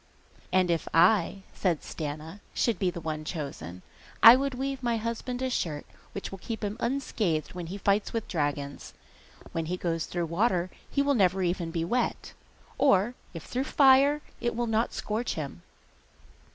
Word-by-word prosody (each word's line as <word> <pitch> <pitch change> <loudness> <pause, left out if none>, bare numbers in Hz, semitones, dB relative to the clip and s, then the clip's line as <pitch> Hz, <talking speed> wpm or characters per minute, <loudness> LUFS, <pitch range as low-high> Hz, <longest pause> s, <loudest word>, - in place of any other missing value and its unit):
'And 185 -1 +3
if 165 - -1
I,' 190 +2 +4
said 175 -5 0
Stana, 155 +4 -6 0.2
'should 225 -7 +1
be 185 - +2
the 175 - -5
one 155 -1 -4
chosen, 135 - -6 0.4
I 230 +2 +12
would 275 0 -1
weave 270 +1 -3
my 235 -2 +1
husband 235 +3 -3
a 260 - 0
shirt 155 -10 -2 0.3
which 200 - -5
will 195 - -7
keep 225 +3 -5
him 205 0 -2
unscathed 225 - -1
when 175 -2 -6
he 190 +4 -5
fights 200 +1 +1
with 230 -2 -3
dragons; 145 -4 -3 0.6
when 165 -1 -2
he 180 +2 -2
goes 165 -2 -2
through 175 -1 -2
water 180 +1 +1 0.2
he 280 - +1
will 285 0 +2
never 190 -5 +3
even 175 -1 -1
be 165 0 -2
wet; 240 +7 -1 0.5
or 240 -4 +4 0.2
if 165 - -6
through 260 +2 -2
fire, 280 +2 +5 0.2
it 240 -1 -1
will 240 +1 0
not 225 0 +1
scorch 220 +3 -2
him. 140 - -5
190 Hz, 170 wpm, -28 LUFS, 165-240 Hz, 0.6 s, I